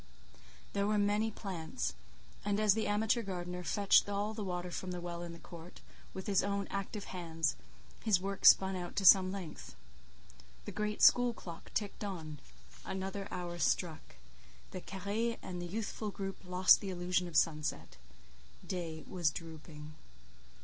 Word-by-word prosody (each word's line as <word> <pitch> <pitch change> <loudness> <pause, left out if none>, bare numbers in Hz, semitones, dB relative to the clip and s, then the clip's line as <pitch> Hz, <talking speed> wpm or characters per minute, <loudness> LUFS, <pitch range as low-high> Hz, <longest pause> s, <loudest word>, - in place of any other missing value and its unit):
There 200 0 +1
were 210 0 +2
many 205 +2 +2
plants, 160 - -4 0.5
and 205 0 0
as 215 -2 +5
the 220 +1 -1
amateur 220 +3 +2
gardener 180 -3 -4
fetched 200 +2 +4
all 205 +2 -1
the 215 -1 -4
water 180 -1 -3
from 185 - -4
the 180 -1 -3
well 175 0 -5
in 175 -1 -6
the 170 - -9
court, 170 +1 -11 0.3
with 190 - -7
his 200 -2 +3
own 200 0 -1
active 200 +1 -3
hands, 165 -5 -2 0.5
his 205 -5 +4
work 195 +1 -4
spun 190 0 +7
on 175 -1 -5
to 195 - 0
some 185 0 +8
length. 185 - -7 0.9
The - - -5
great 210 0 -2
school 245 -1 +7
clock 170 -6 -10
ticked 205 0 -2
on. 160 -7 -5 0.4
Another 195 +1 -4
hour 175 -1 -5
struck. 160 - -1 0.6
The - - -6
carré 210 +5 -2
and 180 -1 -5
the 175 - -4
youthful 215 +2 -3
group 195 -1 -5
lost 180 +1 +6
the 195 - -4
illusion 180 0 0
of 165 -3 -1
sunset. 155 - 0 0.7
Day 165 -4 -4
was 175 -4 +1
drooping. 155 -2 -9
185 Hz, 155 wpm, -34 LUFS, 170-200 Hz, 0.9 s, some